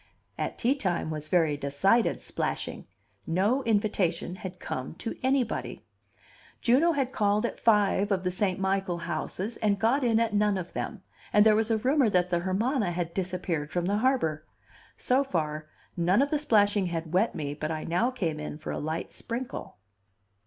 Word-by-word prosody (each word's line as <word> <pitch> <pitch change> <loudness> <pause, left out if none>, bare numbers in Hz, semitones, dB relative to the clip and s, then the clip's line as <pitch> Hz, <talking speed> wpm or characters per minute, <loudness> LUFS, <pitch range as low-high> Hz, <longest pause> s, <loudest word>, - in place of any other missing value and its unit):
At - - -3
tea 245 +3 +2
time 180 - -2
was 155 -1 -4
very 160 -3 +2
decided 145 +12 +2
splashing. - - -3 0.4
No 200 +11 +2
invitation 200 -5 0
had 180 -1 -7
come 130 0 -5
to 225 - -5
anybody. 260 -2 -1 0.7
Juno 285 +8 +4
had 270 -4 -1
called 210 -2 +1
at - - -4
five 205 -2 +3
of 190 -2 +1
the 180 - 0
St. 185 0 0
Michael 190 -2 0
houses 185 +6 -3
and 205 -2 +1
got 235 +7 +2
in 230 -2 +3
at 230 -2 0
none 210 -1 +2
of 180 -1 -6
them, 220 -6 -4 0.3
and 210 0 +5
there 215 -1 +6
was 220 +1 +1
a 225 - +3
rumor 260 +2 +3
that 180 -2 +1
the 175 - +2
Hermana 205 +5 0
had 170 -1 -3
disappeared 180 -5 -2
from 175 -1 -1
the 200 +3 +1
harbor. 225 - +1 0.5
So 260 +2 +2
far, 155 - -3 0.3
none 180 +8 +3
of 285 - -3
the 300 - +2
splashing 205 -7 +3
had 165 -1 -4
wet 195 +6 +2
me 145 -2 -3
but 155 +1 -4
I 155 -1 -3
now 180 +9 +1
came 170 -12 -2
in 150 -1 -5
for 155 - -6
a - - -3
light 160 +2 -4
sprinkle. 235 -5 -6
195 Hz, 180 wpm, -28 LUFS, 170-230 Hz, 0.7 s, there